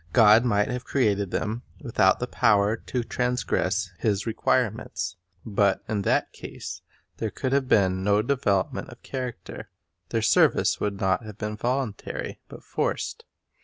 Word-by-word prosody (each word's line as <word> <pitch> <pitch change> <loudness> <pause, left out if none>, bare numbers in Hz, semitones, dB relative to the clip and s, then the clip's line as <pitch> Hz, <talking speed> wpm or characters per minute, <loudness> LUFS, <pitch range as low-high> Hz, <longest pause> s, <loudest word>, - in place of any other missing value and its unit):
God 110 -1 +7
might 105 -4 +2
have 125 0 -3
created 105 -9 +1
them 110 +6 -2 0.2
without 115 -8 +3
the 125 - -1
power 105 -4 +3
to 120 +2 -3
transgress 110 -6 -1
His 100 -3 0
requirements; 115 0 -1 0.3
but 100 -2 +1
in 105 -2 -1
that - - +1
case - - -8 0.4
there 110 - -2
could 130 +5 -3
have 140 -2 +2
been 95 -4 +3
no 105 +1 +3
development 105 -7 0
of - - -14
character; 130 -3 -6 0.4
their - - 0
serv - - +5
ice - - +1
would 100 -1 -2
not 95 +2 +1
have 105 -2 -9
been 105 0 -3
voluntary, 120 -1 -3
but - - -11
forced. - - -2
110 Hz, 150 wpm, -26 LUFS, 100-125 Hz, 0.4 s, God